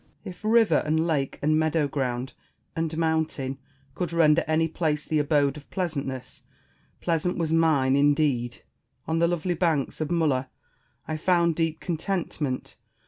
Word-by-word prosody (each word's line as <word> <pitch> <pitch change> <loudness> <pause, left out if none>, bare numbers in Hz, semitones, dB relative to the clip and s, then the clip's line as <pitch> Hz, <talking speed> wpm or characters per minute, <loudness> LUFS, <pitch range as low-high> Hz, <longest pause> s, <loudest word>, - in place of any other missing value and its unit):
Spenser. - - -6
If 180 - -25
river 220 -7 +4
and 160 +2 +1
lake 145 -5 -1
and 155 +1 +3
meadow 160 -1 +1
ground 130 -2 -3 0.4
and 160 -1 -2
mountain 160 -5 -1 0.3
could 180 +3 -3
render 165 -1 +4
any 160 +1 +2
place 155 -2 -1
the 155 - 0
abode 145 -1 +2
of 150 - -13
pleasantness, 140 -8 -4 0.6
pleasant 170 +1 0
was 165 -2 0
mine, 150 -5 +3
indeed! 140 -4 +1 0.4
On 160 +1 0
the 170 - +4
lovely 175 +1 -1
banks 160 -4 0
of 155 - -1
Mulla 145 -7 +1 0.6
I 155 - -2
found 170 0 +2
deep 165 -1 -1
contentment. 165 -6 -3
155 Hz, 145 wpm, -26 LUFS, 145-165 Hz, 0.6 s, river